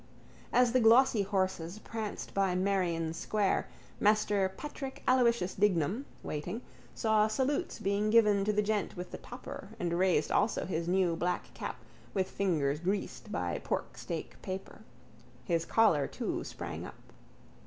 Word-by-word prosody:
As 245 -1 +4
the 255 - +4
glossy 235 0 +6
horses 190 -2 -1
pranced 220 -1 -5
by 195 -2 +2
Merrion 180 -4 0
square 200 +4 0 0.3
Master 205 -2 +3
Patrick 270 +5 -7
Aloysius 235 -7 +3
Dignam, 200 - +1 0.2
waiting, 175 +10 -4 0.3
saw 220 -2 +3
salutes 260 +6 -1
being 200 +2 0
given 210 -3 +5
to 210 - +2
the 210 0 +1
gent 210 -3 -1
with 180 0 -6
the - - -6
topper 245 -5 -8
and 170 -3 -1
raised 180 -5 +2
also 215 +2 +2
his 170 -2 -2
new 180 -2 +2
black 175 +2 -2
cap - - -5 0.4
with 190 -1 0
fingers 150 -7 +1
greased 195 +4 -3
by - - -2
porksteak - - -4
paper. 190 -1 -6 0.7
His 170 -2 +1
collar 170 -12 +4
too - - -3
sprang - - -6
up. - - -10
200 Hz, 140 wpm, -31 LUFS, 180-220 Hz, 0.7 s, glossy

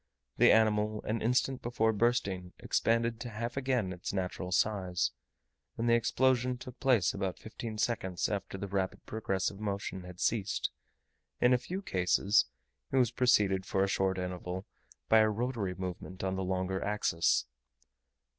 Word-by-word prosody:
The - - +7
animal 110 -1 +3
an 110 +1 -2
instant 125 +3 +1
before 110 -2 +1
bursting 100 -5 0
expanded 115 0 +1
to 120 - -5
half 115 +2 -4
again 130 -8 0
its 90 - -5
natural 90 -1 -3
size; 95 -3 +1 0.7
and 115 - -1
the 115 - +5
explosion 125 +1 +2
took 125 0 -10
place 120 -9 +3
about 95 -2 -3
fifteen 110 0 -7
seconds 95 -5 0
after 100 -2 -3
the 100 +1 -4
rapid 95 -1 -2
progressive 100 -2 -2
motion 100 -2 -3
had 90 0 -11
ceased: 105 -4 0 0.7
in 125 +1 +5
a 125 - +3
few 185 +10 -5
cases 95 - +3 0.5
it 135 - +1
was 125 -4 +4
preceded 100 -6 +3
for 95 0 +1
a - - +2
short 95 -1 +1
interval 90 +1 -4 0.4
by 110 - +6
a 110 0 +5
rotatory 110 -4 -2
movement 95 0 -6
on 95 0 0
the 95 - -2
longer 95 0 -1
axis. 105 -5 +1
105 Hz, 155 wpm, -31 LUFS, 95-115 Hz, 0.7 s, The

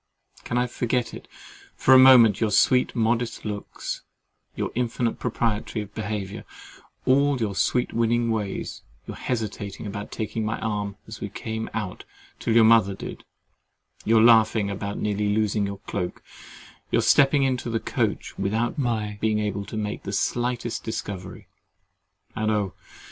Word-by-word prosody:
Can 120 - -2
I 125 - +2
forget 120 0 -1
it - - -10 0.5
for 130 - +4
a 130 - +9
moment—your 115 -5 +7
sweet 125 +5 +3
modest 115 0 0
looks, 105 -1 -5 0.5
your - - -2
infinite 120 -1 -1
propriety 115 -2 -1
of 105 -1 -10
behaviour, 105 -2 -4 0.6
all 140 +1 +3
your 110 -4 -1
sweet 125 +5 0
winning 115 0 +1
ways—your 105 -3 -5
hesitating 110 -4 -4
about 105 0 -6
taking 110 0 -3
my 110 +1 -1
arm 105 -2 -2
as 110 -1 -9
we 105 - -3
came 110 +2 -5
out 105 -5 -4 0.4
till 115 - 0
your 115 - +7
mother 110 -4 +5
did—your 110 +3 -3
laughing 110 -3 +5
about 100 +1 -4
nearly 105 0 0
losing 105 -1 +1
your 100 0 -5
cloak—your 90 -3 -5
stepping 140 0 +5
into 130 -2 0
the 115 -1 0
coach - - -2
without 110 +7 -1
my 110 -5 -1
being 110 -1 +2
able 105 -1 -2
to 110 - -6
make 105 0 -3
the 100 - -6
slightest 120 +1 -1
discovery—and 105 +1 -7
oh! 105 -3 0
110 Hz, 140 wpm, -25 LUFS, 105-120 Hz, 0.6 s, a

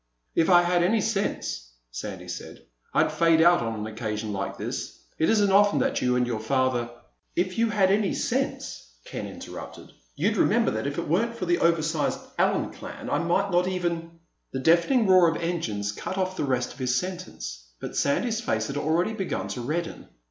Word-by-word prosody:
"If 165 - +2
I 175 -1 +7
had 175 0 +2
any 210 +6 +3
sense," 60 - -2 0.2
Sandy 90 - -6
said, 90 -8 -8 0.3
"I'd - - +2
fade 165 -1 +4
out 175 +2 +6
on 115 -1 -2
an 105 0 -4
occasion 110 -1 -4
like 100 0 -3
this. - - -5 0.2
It 160 - +3
isn't 205 -3 +4
often 200 -4 +5
that 130 - +1
you 125 0 +2
and 125 0 +2
your 120 -3 -2
father—" 125 +1 0 0.5
"If 185 +4 0
you 230 0 +3
had 195 -3 +3
any 200 -1 +2
sense," - - -2
Ken - - -5
interrupted, - - -9 0.2
"you'd - - +1
remember - - +3
that 110 +5 -2
if 140 - -4
it - - -2
weren't 230 +9 +1
for 185 - -3
the 175 0 +2
oversized 160 -2 +1 0.2
Allen - - +2
clan - - -8
I - - +2
might 185 +4 +1
not 180 +1 +3
even—" 170 -2 -3 0.3
The - - -3
deafening 170 - +4
roar 185 -3 +6
of 165 - -2
engines 115 -13 -2
cut 185 - -5
off 185 0 -1
the 150 - -1
rest 125 -2 -1
of 130 - -17
his 125 -1 +1
sentence, 125 - -5
but - - -6
Sandy's 225 +11 +1
face 110 - 0
had 140 +5 -4
already 165 +8 +1
begun 195 -4 -3
to 125 - -4
redden. 165 +6 -3
165 Hz, 190 wpm, -26 LUFS, 120-185 Hz, 0.5 s, I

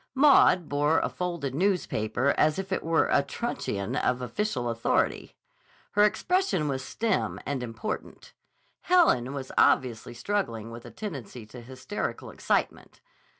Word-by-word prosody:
Maud 260 - +5
bore 145 +2 +2
a - - -1
folded 170 -7 -3
newspaper 140 - 0
as 155 0 +2
if 195 0 -5
it 190 - -1
were 165 0 +2
a - - +4
truncheon 130 - -3
of 125 -3 +1
official 125 - -2
authority. 115 0 -1 0.6
Her 205 - +2
expression 360 - +1
was 130 -2 -2
stern 220 - -1
and 140 -3 -2
important. 125 - -6 0.5
Helen 330 - +3
was 135 -2 -6
obviously 120 -2 +2
struggling 115 - -2
with 115 0 -10
a - - -8
tendency 135 - -7
to 120 +3 -11
hysterical 130 - -5
excitement. - - -2
140 Hz, 135 wpm, -27 LUFS, 120-195 Hz, 0.6 s, Maud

